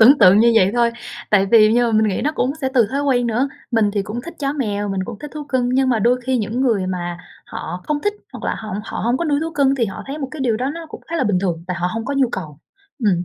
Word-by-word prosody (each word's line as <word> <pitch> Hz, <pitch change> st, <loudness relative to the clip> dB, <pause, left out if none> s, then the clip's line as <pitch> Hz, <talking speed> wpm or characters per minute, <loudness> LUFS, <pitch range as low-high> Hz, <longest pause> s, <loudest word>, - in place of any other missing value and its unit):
tưởng 265 Hz, +6 st, +8 dB
tượng 185 Hz, +3 st, +7 dB
như 235 Hz, +1 st, +5 dB
vậy 190 Hz, -2 st, +5 dB
thôi. 235 Hz, -1 st, +3 dB, 0.4 s
Tại 195 Hz, -2 st, +4 dB
vì 215 Hz, +1 st, +6 dB
nhưng 240 Hz, +1 st, +3 dB
mà 230 Hz, -, -1 dB
mình 215 Hz, 0 st, +3 dB
nghĩ 195 Hz, -, -1 dB
nó 300 Hz, -, 0 dB
cũng 260 Hz, -3 st, 0 dB
sẽ 265 Hz, -, 0 dB
từ 235 Hz, -4 st, +5 dB
thói 280 Hz, +2 st, -1 dB
quen 250 Hz, -4 st, +2 dB
nữa, 240 Hz, +4 st, +1 dB, 0.2 s
mình 225 Hz, -4 st, +2 dB
thì 205 Hz, -, 0 dB
cũng 215 Hz, +4 st, -5 dB
thích 340 Hz, -, -9 dB
chó 275 Hz, -2 st, -1 dB
mèo, 205 Hz, -8 st, -2 dB
mình 195 Hz, -1 st, -2 dB
cũng 220 Hz, -1 st, -8 dB
thích 295 Hz, -, -8 dB
thú 300 Hz, -1 st, -5 dB
cưng, 260 Hz, -3 st, 0 dB
nhưng 260 Hz, +1 st, +2 dB
mà 240 Hz, -3 st, +2 dB
đôi 245 Hz, +4 st, +2 dB
khi 260 Hz, -1 st, +2 dB
những 225 Hz, +3 st, -2 dB
người 220 Hz, -8 st, +1 dB
mà 175 Hz, -1 st, -3 dB, 0.3 s
họ 180 Hz, -, -6 dB
không 300 Hz, -1 st, -1 dB
thích 415 Hz, 0 st, 0 dB, 0.2 s
hoặc -, -, -8 dB
là -, -, 0 dB
họ 220 Hz, -, -8 dB, 0.2 s
họ -, -, -6 dB
hông 240 Hz, +2 st, +2 dB
có 340 Hz, -, -2 dB
nuôi 290 Hz, -2 st, +1 dB
thú 325 Hz, -, -3 dB
cưng, 275 Hz, -3 st, +3 dB
thì 235 Hz, -4 st, 0 dB
họ 195 Hz, -, -7 dB
thấy 285 Hz, +3 st, -5 dB
một 275 Hz, -, -4 dB
cái 305 Hz, -, -8 dB
điều 235 Hz, -4 st, +1 dB
đó 255 Hz, +4 st, -1 dB
nó 335 Hz, -1 st, -7 dB
cũng -, -, -9 dB
khá 335 Hz, -, -1 dB
là 265 Hz, -, +1 dB
bình 205 Hz, -4 st, +2 dB
thường, 170 Hz, -3 st, -2 dB
tại 180 Hz, -1 st, -3 dB
họ 175 Hz, -, +1 dB
hông 225 Hz, 0 st, -3 dB
có 280 Hz, -, -2 dB
nhu 270 Hz, -2 st, +3 dB
cầu. 155 Hz, -6 st, -6 dB, 0.5 s
Ừm, 180 Hz, -3 st, +2 dB
235 Hz, 310 wpm, -20 LUFS, 205-275 Hz, 0.5 s, tưởng